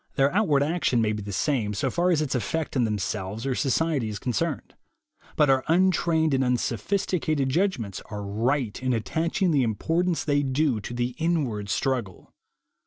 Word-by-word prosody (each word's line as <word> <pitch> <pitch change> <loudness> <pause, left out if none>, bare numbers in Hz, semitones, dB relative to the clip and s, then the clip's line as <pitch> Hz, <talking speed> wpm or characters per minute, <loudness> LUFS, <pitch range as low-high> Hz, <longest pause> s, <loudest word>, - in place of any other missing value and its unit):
Their 135 +2 +3
outward 155 -9 +3
action 155 -5 +1
may 110 -2 +2
be 105 -1 -3
the 100 0 -6
same, 105 0 0
so 130 +6 -1
far 175 +1 +1
as 160 -4 +2
its 140 - -3
effect 150 +6 -2
on 125 -3 +3
themselves 105 +1 -3
or 135 - 0
society 140 -1 0
is 105 - -4
con 125 +4 -3
cerned; 165 +1 -2 0.6
but 150 - +4
our 135 -1 +3
untrained 165 -2 +2
and 135 0 +2
unsophisticated 135 - 0
judgments 130 - -1
are 105 -1 -5
right 115 +4 -1
in 130 -1 0
attaching 165 - 0
the 145 -3 +3
importance 165 - 0
they 145 -1 +2
do 135 -3 +1
to 120 +4 -7
the 120 0 0
inward 140 -12 -1
struggle. 115 -4 -2
135 Hz, 175 wpm, -26 LUFS, 115-160 Hz, 0.6 s, but